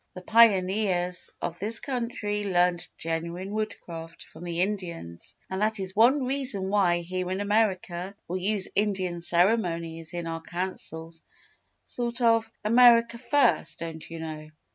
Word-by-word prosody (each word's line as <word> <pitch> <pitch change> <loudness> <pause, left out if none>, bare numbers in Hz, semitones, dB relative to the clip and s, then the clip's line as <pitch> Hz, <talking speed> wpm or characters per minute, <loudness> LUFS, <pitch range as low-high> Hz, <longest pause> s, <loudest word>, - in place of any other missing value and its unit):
"The 185 - -9
pioneers 190 -4 +3
of 170 0 -4
this 215 +3 +5
country 235 -5 -3
learned 180 -2 +1
genuine 170 +4 -4
Woodcraft 170 -6 -6
from 160 - -13
the 170 0 -2
Indians, 175 - -4
and 190 +1 -4
that 215 0 +1
is 190 -1 -4
one 255 +6 +4
reason 255 -8 0
why, 185 -4 +2
here 180 +1 -4
in 185 +1 -2
America, 200 -3 -1
we 185 +2 -3
use 200 0 +1
Indian 190 -4 -1
ceremonies 170 -2 +1
in 175 -1 -4
our 165 0 -4
Councils 165 -2 -5 0.6
sort 240 0 -3
of 230 -2 +2
"America 235 0 +5
First" 265 0 +2
don't 165 -1 -7
you 165 -1 -7
know. 155 -1 -7
185 Hz, 140 wpm, -27 LUFS, 170-215 Hz, 0.6 s, this